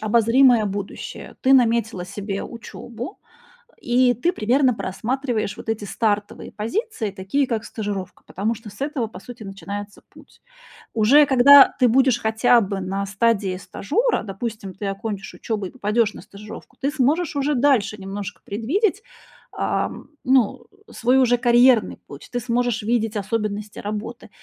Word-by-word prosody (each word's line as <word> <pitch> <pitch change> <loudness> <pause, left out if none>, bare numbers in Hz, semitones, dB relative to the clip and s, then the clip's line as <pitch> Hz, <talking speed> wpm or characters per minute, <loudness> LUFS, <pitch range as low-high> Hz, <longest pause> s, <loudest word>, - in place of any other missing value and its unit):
обозримое 230 +2 +4
будущее, 200 0 -6
ты 265 - +3
наметила 230 -7 +2
себе 200 +1 -5
учёбу, 235 - -8 0.6
и 245 +1 +3
ты 290 - 0
примерно 255 - +2
просматриваешь 220 +2 -3
вот - - -9
эти 220 -2 -2
стартовые 205 0 -2
позиции, 230 - -3
такие 200 +9 -1
как 230 -3 -2
стажировка, 205 -4 -6
потому 210 +5 -2
что 225 -1 -10
с 205 +5 -14
этого, 280 -5 -2
по 215 - -11
сути, 235 +2 -10
начинается 200 +1 -7
путь. - - -19 0.5
Уже 250 +7 +5
когда 275 +1 +7
ты 250 - +5
будешь 255 0 +3
хотя 225 +2 +3
бы 195 -1 -3
на 195 +2 -3
стадии 200 -1 0
стажера, 435 - -1
допустим, 205 -1 -6
ты 195 +3 -7
окончишь 200 +1 -5
учёбу 210 -4 -3
и - - -12
попадешь 215 -2 0
на - - -10
стажировку, 210 +2 -12
ты 275 +2 0
сможешь 300 +3 0
уже 285 +1 +1
дальше 245 -5 +2
немножко 195 0 -7
предвидеть, 350 - -1 0.5
ам, - - -3 0.2
ну, 255 -4 +2 0.2
свой 250 +3 +2
уже 245 -2 +4
карьерный 240 -1 +4
путь, 140 0 -12
ты 245 - 0
сможешь 245 -1 -1
видеть 225 0 0
особенности 210 0 -3
работы. 215 +3 -6
225 Hz, 145 wpm, -22 LUFS, 205-255 Hz, 0.6 s, когда